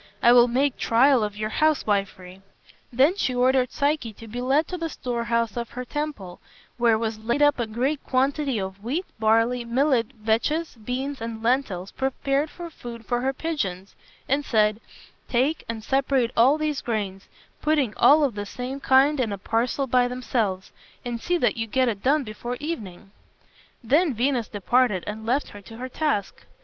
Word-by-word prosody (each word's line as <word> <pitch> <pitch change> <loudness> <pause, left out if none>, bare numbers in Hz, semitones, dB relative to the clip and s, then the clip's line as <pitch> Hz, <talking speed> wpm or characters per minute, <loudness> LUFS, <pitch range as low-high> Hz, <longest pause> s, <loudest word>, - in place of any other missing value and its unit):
I 240 - +7
will 245 0 +7
make 260 +3 +1
trial 250 +1 +4
of 210 -1 -3
your 215 0 -3
housewifery." 195 -11 0 0.5
Then 270 +9 +4
she 255 -10 0
ordered 255 0 +2
Psyche 285 -6 -1
to 225 +2 -12
be 240 +3 -5
led 275 +5 +2
to 360 - -4
the 330 0 -2
storehouse 235 -4 -2
of 235 -1 -4
her 250 0 -6
temple, 280 -11 -5 0.4
where 235 -2 +3
was 220 -1 -3
laid 235 +6 0
up 290 -2 +4
a 235 - -1
great 260 +7 -1
quantity 270 0 0
of 190 +1 -6
wheat, 300 +11 -2
barley, 230 +3 +2
millet, 250 0 +1
vetches, 230 +10 0
beans, 260 +3 -3
and 225 -1 -5
lentils 225 -7 0
prepared 275 +2 -1
for 345 +1 -9
food 235 -5 -9
for 240 +2 -1
her 265 +1 +1
pigeons, 205 - -4 0.3
and 280 +2 +1
said, 215 -3 +2 0.5
"Take 265 +6 +1
and 225 -1 -4
separate 265 -2 +1
all 260 +6 +5
these 305 -2 -2
grains, 200 -5 -3 0.3
putting 295 -7 +1
all 300 +1 +6
of 270 -5 +1
the 205 0 -5
same 255 +5 -5
kind 275 +2 +4
in 230 -5 0
a 200 - -3
parcel 235 +7 -1
by 250 -1 +3
themselves, 230 -6 -2 0.3
and 235 -1 -4
see 355 +6 0
that 330 - +1
you 225 0 -2
get 255 +3 +1
it 210 -4 -2
done 285 +3 +2
before 240 +2 -6
evening." 205 - -6 0.7
Then 295 +4 +2
Venus 245 -1 0
departed 210 -1 +1
and 220 +1 -6
left 265 +5 0
her 205 - -11
to 225 +3 -12
her 255 +2 -6
task. 255 -9 -2
245 Hz, 175 wpm, -24 LUFS, 220-275 Hz, 0.7 s, I